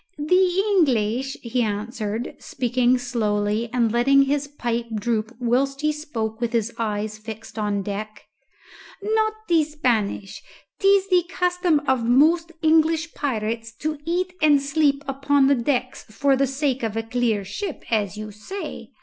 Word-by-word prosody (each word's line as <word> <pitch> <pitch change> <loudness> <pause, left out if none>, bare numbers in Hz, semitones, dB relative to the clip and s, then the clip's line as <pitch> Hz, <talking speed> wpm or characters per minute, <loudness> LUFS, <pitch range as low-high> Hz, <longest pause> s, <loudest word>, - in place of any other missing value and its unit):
"The 365 +5 +3
English," 260 - +1
he 245 +1 -1
answered, 215 +1 -3
speaking 250 0 +1
slowly 220 -2 -1
and 235 -3 +1
letting 275 +4 +4
his 285 +1 0
pipe 240 -5 -3
droop 215 +1 -1
whilst 265 +3 0
he 305 0 +2
spoke 235 -7 -4
with 235 0 -1
his 230 0 0
eyes 215 -1 -2
fixed 220 0 -8
on 205 -2 -1
deck, 210 +1 -6 0.8
"not 435 +1 +1
the 330 -2 +4
Spanish. 235 -10 -1 0.4
'Tis 395 0 +4
the 360 -2 +4
custom 355 -4 +1
of 260 -3 +2
most 325 +6 +4
English 320 +1 +3
pirates 230 -4 -2
to 305 +3 -3
eat 360 +3 -1
and 300 -2 +5
sleep 280 0 +1
upon 275 +1 +2
the 280 - +5
decks 255 0 -1
for 275 +5 +2
the 275 +1 +2
sake 270 -1 -1
of 225 -1 -2
a 225 - -1
clear 225 -3 0
ship, 365 - -5
as 210 -2 0
you 215 0 -6
say. 215 - -7
255 Hz, 150 wpm, -23 LUFS, 220-300 Hz, 0.8 s, and